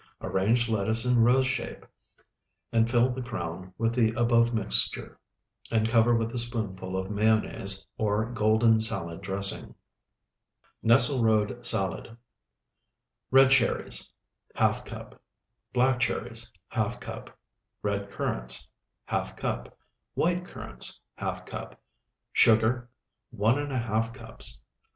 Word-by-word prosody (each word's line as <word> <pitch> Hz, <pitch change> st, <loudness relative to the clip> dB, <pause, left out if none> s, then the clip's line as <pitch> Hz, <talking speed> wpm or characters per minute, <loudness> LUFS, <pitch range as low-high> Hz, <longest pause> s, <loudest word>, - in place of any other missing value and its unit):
Arrange 115 Hz, +5 st, 0 dB
lettuce 110 Hz, +1 st, +1 dB
in 125 Hz, -2 st, +3 dB
rose 125 Hz, +3 st, +4 dB
shape, 130 Hz, 0 st, -4 dB, 0.9 s
and 115 Hz, 0 st, +2 dB
fill 120 Hz, +1 st, +2 dB
the 130 Hz, +1 st, -5 dB
crown 95 Hz, -6 st, -6 dB
with 115 Hz, 0 st, 0 dB
the 115 Hz, -2 st, +2 dB
above 120 Hz, 0 st, +3 dB
mixture, 110 Hz, -4 st, 0 dB, 0.5 s
and 110 Hz, -1 st, +1 dB
cover 115 Hz, +1 st, +3 dB
with 115 Hz, 0 st, -1 dB
a 120 Hz, -, -1 dB
spoonful 100 Hz, -6 st, -4 dB
of 95 Hz, +1 st, -4 dB
mayonnaise 100 Hz, -2 st, +1 dB
or 105 Hz, 0 st, 0 dB
golden 110 Hz, 0 st, +2 dB
salad 95 Hz, -7 st, 0 dB
dressing. 100 Hz, +1 st, -1 dB, 1.1 s
NESSLERODE 115 Hz, -2 st, +4 dB
SALAD 110 Hz, +2 st, +3 dB, 1.1 s
Red 135 Hz, 0 st, +5 dB
cherries, 130 Hz, -2 st, +3 dB, 0.4 s
½ -, -, 0 dB
cup. -, -, -11 dB, 0.5 s
Black 125 Hz, 0 st, +1 dB
cherries, 115 Hz, -2 st, -2 dB, 0.2 s
½ -, -, -2 dB
cup. -, -, -9 dB, 0.5 s
Red 100 Hz, -1 st, -3 dB
currants, -, -, -2 dB, 0.4 s
½ -, -, -3 dB
cup. -, -, -5 dB, 0.4 s
White 175 Hz, +2 st, 0 dB
currants, -, -, 0 dB, 0.2 s
½ -, -, -5 dB
cup. -, -, -9 dB, 0.5 s
Sugar, 115 Hz, +2 st, +3 dB, 0.5 s
1½ 115 Hz, -1 st, -1 dB
cups. -, -, -1 dB
115 Hz, 110 wpm, -27 LUFS, 105-120 Hz, 1.1 s, Red